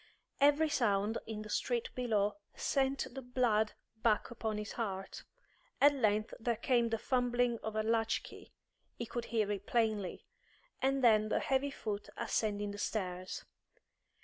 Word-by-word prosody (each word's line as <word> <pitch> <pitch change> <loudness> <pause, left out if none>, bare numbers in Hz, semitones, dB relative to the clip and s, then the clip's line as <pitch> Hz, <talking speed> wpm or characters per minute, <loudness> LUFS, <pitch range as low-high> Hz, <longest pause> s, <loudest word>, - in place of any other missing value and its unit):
Every 290 +2 +5
sound 210 -4 +1
in 215 -1 -4
the 215 - -10
street 240 -2 0
below 215 -5 +1 0.2
sent 270 -1 0
the 270 - -5
blood 240 -4 +1 0.2
back 220 0 +1
upon 220 -2 -2
his 210 -1 -4
heart. 195 -4 -4 0.6
At 285 +1 +7
length 215 -5 +1
there 235 +1 0
came 235 0 +2
the 225 - 0
fumbling 245 0 +1
of 220 -1 -4
a 215 - +1
latch 225 0 +1
key - - -12 0.4
he 235 - -4
could 235 +1 -4
hear 215 -3 0
it 200 -1 -4
plainly 215 -5 0 0.6
and 270 0 +2
then 215 -2 +5
the - - +2
heavy 270 +1 +1
foot 210 -6 -4
ascending 210 -3 -1
the 205 - -7
stairs. 185 -4 -3
225 Hz, 150 wpm, -34 LUFS, 210-245 Hz, 0.6 s, At